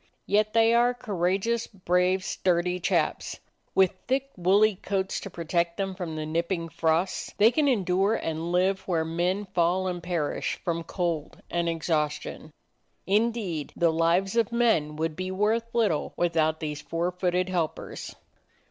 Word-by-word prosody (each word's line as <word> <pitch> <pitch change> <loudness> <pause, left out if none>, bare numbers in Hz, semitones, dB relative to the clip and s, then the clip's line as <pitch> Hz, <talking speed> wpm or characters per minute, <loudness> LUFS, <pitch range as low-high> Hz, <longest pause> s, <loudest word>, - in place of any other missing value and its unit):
Yet 215 +1 +2
they 225 0 +5
are 240 +1 +4
courage 195 -4 -1
ous, 235 0 0
brave, 185 -1 +1
sturdy 180 0 0
chaps. - - 0 0.4
With 190 -2 +5 0.2
thick, 270 +2 0
woolly 200 +4 +4
coats 190 -1 -2
to 195 - -7
protect 170 0 -1
them 195 -1 -2
from 175 -4 -5
the 155 0 -3
nipping 170 +2 -2
frosts, 165 +3 0
they 215 +3 +6
can 300 +2 +2
endure 195 -3 +2
and 165 -2 -3
live 185 +2 +2
where 165 -3 +1
men 175 +5 -1
fall 180 +2 +2
and 175 -1 -3
perish 170 -4 -2
from 170 -2 0
cold 170 +1 -3
and 170 0 0
exhaustion. 155 -2 -2 0.6
Indeed 205 -6 0
the 170 -1 +3
lives 170 +5 +2
of 230 -1 +2
men 220 -11 +2
would 160 0 -2
be 185 +2 -4
worth 215 +4 0
little 220 -10 +1
without 160 -2 +1
these 150 -1 -4
four 170 +3 -2
footed 180 0 0
helpers. 170 -4 -3
180 Hz, 150 wpm, -27 LUFS, 165-200 Hz, 0.6 s, they